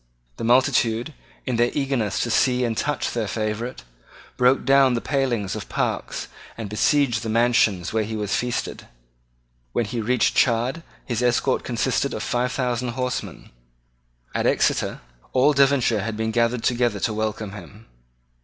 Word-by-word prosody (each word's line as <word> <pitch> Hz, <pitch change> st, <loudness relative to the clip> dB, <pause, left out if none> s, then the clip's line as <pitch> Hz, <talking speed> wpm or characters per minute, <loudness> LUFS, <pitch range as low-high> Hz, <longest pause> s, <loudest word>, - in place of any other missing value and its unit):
The -, -, -6 dB
multitude, 120 Hz, +1 st, +2 dB, 0.3 s
in 125 Hz, -3 st, -1 dB
their 120 Hz, +1 st, +3 dB
eagerness 130 Hz, -9 st, -1 dB
to 120 Hz, -, -1 dB
see 125 Hz, +2 st, +2 dB
and 115 Hz, -1 st, -1 dB
touch 145 Hz, +6 st, -1 dB
their 115 Hz, -3 st, -2 dB
favourite, 110 Hz, +4 st, -3 dB, 0.5 s
broke 125 Hz, +2 st, +3 dB
down 135 Hz, -2 st, +5 dB
the -, -, 0 dB
palings 120 Hz, -8 st, -1 dB
of -, -, -7 dB
parks, -, -, -2 dB, 0.3 s
and 110 Hz, -3 st, -6 dB
besieged 120 Hz, +1 st, +2 dB
the 115 Hz, -, -4 dB
mansions 110 Hz, -5 st, +2 dB
where 110 Hz, -1 st, +1 dB
he 110 Hz, +1 st, -5 dB
was 105 Hz, -2 st, -1 dB
feasted. 120 Hz, 0 st, -3 dB, 0.9 s
When 120 Hz, -, +1 dB
he 115 Hz, +2 st, -3 dB
reached 125 Hz, +2 st, +2 dB
Chard 125 Hz, +6 st, +2 dB, 0.2 s
his 120 Hz, -2 st, -2 dB
escort 120 Hz, -1 st, +1 dB
consisted -, -, -1 dB
of -, -, -4 dB
five 125 Hz, +1 st, 0 dB
thousand 125 Hz, -2 st, -1 dB
horsemen. 125 Hz, -1 st, -4 dB, 0.8 s
At -, -, 0 dB
Exeter -, -, +1 dB, 0.3 s
all 135 Hz, +4 st, +4 dB
Devonshire 135 Hz, -6 st, +3 dB
had 105 Hz, +1 st, -4 dB
been 110 Hz, 0 st, -1 dB
gathered 115 Hz, +1 st, +1 dB
together 120 Hz, -4 st, +1 dB
to 110 Hz, -, 0 dB
welcome 110 Hz, -1 st, -3 dB
him. 105 Hz, +3 st, -12 dB
120 Hz, 155 wpm, -23 LUFS, 110-125 Hz, 0.9 s, down